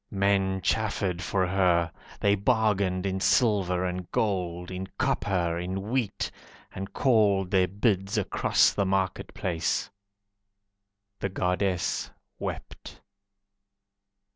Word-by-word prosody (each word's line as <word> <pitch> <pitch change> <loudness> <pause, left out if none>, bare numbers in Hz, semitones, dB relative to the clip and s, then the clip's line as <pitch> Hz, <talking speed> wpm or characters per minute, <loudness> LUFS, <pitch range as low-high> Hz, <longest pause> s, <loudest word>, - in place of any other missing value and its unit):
Men 95 -1 +1
chaffered 100 -5 0
for 95 +1 0
her, 90 -3 +2 0.3
They 100 - +4
bargained 100 -2 +1
in 95 0 -1
silver 95 -5 +2
and 90 0 -4
gold, 90 -4 -1
In 95 +1 -5
copper, 85 -4 0
in 95 +4 -4
wheat, 125 -6 -1 0.4
And 95 +1 -6
called 100 -7 +3
their 95 -2 +4
bids 100 +1 0
across 105 - +3
the - - +1
market 95 -1 -1
place. 85 -3 -1 1.3
The 95 - -2
Goddess 90 0 -1 0.3
wept. - - -7
95 Hz, 105 wpm, -27 LUFS, 90-100 Hz, 1.3 s, They